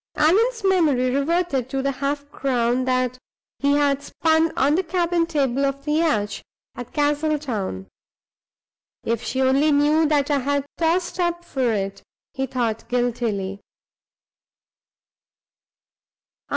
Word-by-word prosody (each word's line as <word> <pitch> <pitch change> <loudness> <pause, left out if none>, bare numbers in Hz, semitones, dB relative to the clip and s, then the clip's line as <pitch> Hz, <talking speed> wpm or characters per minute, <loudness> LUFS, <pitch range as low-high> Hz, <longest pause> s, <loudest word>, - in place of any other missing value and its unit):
Allan's 445 +9 +2
memory 300 -10 +2
reverted 280 -3 0
to 270 0 -2
the 275 - +1
half 285 +2 -3
crown 250 -2 0
that 255 -1 0 0.4
he 280 0 +2
had 285 -1 +2
spun 320 +2 +1
on 280 +2 +3
the 350 - +2
cabin 345 -1 0
table 275 -4 0
of 275 0 -2
the 300 - -1
yacht, 300 -11 0 0.3
at 245 -1 -8
Castletown. 290 - -1 1.2
"If 230 0 -1
she 265 +1 -1
only 275 +4 +3
knew 300 +2 +3
that 290 -1 +1
I 285 - +2
had 280 +1 -1
tossed 345 +2 0
up 345 -1 -1
for 260 -7 0
it!" 195 -2 -3 0.3
he 270 -1 -2
thought, 235 -4 -2
guiltily. 230 -6 -1
280 Hz, 125 wpm, -22 LUFS, 250-315 Hz, 1.2 s, on